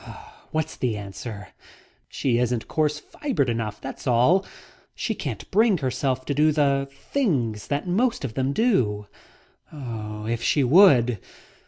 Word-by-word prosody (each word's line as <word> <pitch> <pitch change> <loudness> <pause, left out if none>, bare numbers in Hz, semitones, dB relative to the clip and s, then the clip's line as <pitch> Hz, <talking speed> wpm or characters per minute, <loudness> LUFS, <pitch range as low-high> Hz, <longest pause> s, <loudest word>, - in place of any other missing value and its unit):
What's 155 0 -2
the 120 -4 -1
answer? 100 0 -7 0.6
She 120 -3 0
isn't 125 -2 -1
coarse 150 -1 0
fibred 150 - -2
enough, 110 -2 -3
that's 135 +1 -7
all. 125 +11 +4 0.5
She - - -2
can't - - -6
bring 215 0 +4
herself 130 -2 -1
to 145 - -1
do 150 +2 +4
the 140 -2 +1
things 140 - -1
that 145 +5 -2
most 225 - +1
of 115 - -5
them 135 +2 0
do. 130 - +1 0.7
If 115 -4 -5
she 145 +3 +2
would..." 125 - +5
135 Hz, 135 wpm, -24 LUFS, 115-155 Hz, 0.7 s, would